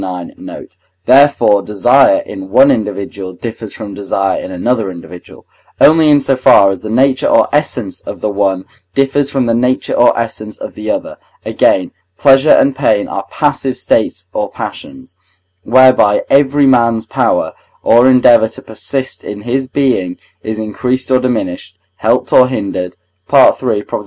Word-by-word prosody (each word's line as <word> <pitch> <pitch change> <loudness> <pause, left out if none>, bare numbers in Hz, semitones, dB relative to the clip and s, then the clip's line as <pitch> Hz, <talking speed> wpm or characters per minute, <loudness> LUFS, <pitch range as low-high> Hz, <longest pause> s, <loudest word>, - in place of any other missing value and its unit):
ix. 90 -2 -7
note); - - -11 0.3
therefore 130 -6 +4
desire 125 - +2
in 95 -1 -9
one 130 +7 +5
individual 100 -5 -4
differs 110 +1 -8
from 100 - -9
desire 95 -1 -2
in - - -8
another 105 +3 -2
individual, 90 0 -12 0.3
only 155 0 +5
in 145 -1 +5
so 135 -1 0
far 100 -6 +4
as 95 - -6
the 110 - -7
nature 130 +4 +1
or - - +3
essence 130 -8 -2
of - - -9
the - - -2
one 100 -2 -1 0.3
differs 135 +1 0
from 135 -3 -1
the 115 - 0
nature 125 +2 -1
or 120 - +3
essence 110 -2 -5
of - - -8
the 105 0 -7
other. - - -4 0.3
Again, 95 - +1 0.3
pleasure 135 +1 +4
and 140 -2 +4
pain 130 -6 0
are - - -6
passive 130 -1 -2
states 90 -5 -1
or 105 -1 -3
passions, 265 - -9 0.5
whereby 125 -2 +3
every 140 +1 +3
man's 115 -4 +2
power - - -1 0.3
or 120 +3 +4
endeavour 125 -3 +4
to - - -11
persist 130 +4 -5
in 105 0 -8
his 130 +2 -2
being 125 -10 -1 0.2
is 110 0 -5
increased 125 +5 -3
or 130 - +4
diminished, 120 -8 -4 0.2
helped - - -1
or 125 - +6
hindered 95 -7 -4 0.3
(III. 130 -5 +3
120 Hz, 155 wpm, -13 LUFS, 100-135 Hz, 0.5 s, or